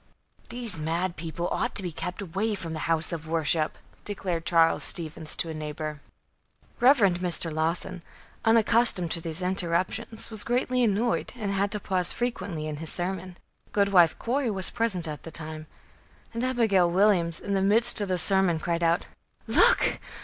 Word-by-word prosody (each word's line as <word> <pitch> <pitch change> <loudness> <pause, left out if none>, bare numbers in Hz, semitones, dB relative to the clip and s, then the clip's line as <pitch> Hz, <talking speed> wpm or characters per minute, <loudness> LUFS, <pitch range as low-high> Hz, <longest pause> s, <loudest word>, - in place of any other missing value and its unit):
"These 235 -8 -4
mad 170 +3 -2
people 165 +2 -4
ought - - -2
to 195 - +2
be 175 - -4
kept 180 +5 -6
away 200 +5 -2
from 165 -4 -6
the 155 - -5
house 165 -1 +2
of 160 -2 -6
worship," 160 -1 0 0.3
declared 180 -5 -4
Charles 165 0 +3
Stevens 160 -2 +1
to 165 - -3
a - - -4
neighbor. 150 -1 -6 0.8
Rev. 265 +4 +6
Mr. 180 - +1
Lawson, 170 +3 -2 0.4
unaccustomed 225 -5 +3
to 165 - +1
these 165 +2 -3
interruptions, 185 +5 -1
was 220 -2 0
greatly 250 +1 0
annoyed 230 +2 0
and 210 -5 -4
had 200 +1 0
to 210 - -2
pause 185 -3 +2
frequently 200 -10 -3
in 155 -1 -5
his 160 +1 -3
sermon. 185 0 -2 0.4
Goodwife 195 -5 +4
Corey 255 +1 -1
was 190 -3 0
present 220 -8 -1
at 150 -1 -6
the - - -9
time, 155 0 -7 0.7
and 230 +1 -3
Abigail 220 -9 +2
Williams, 175 -3 +2
in 200 - -4
the 195 - +1
midst 220 +4 +5
of 205 - -2
the 185 -1 0
sermon, 190 -1 +2
cried 170 +1 -2
out: 170 +2 +1 0.4
"Look! - - +3
180 Hz, 165 wpm, -26 LUFS, 165-210 Hz, 0.8 s, Rev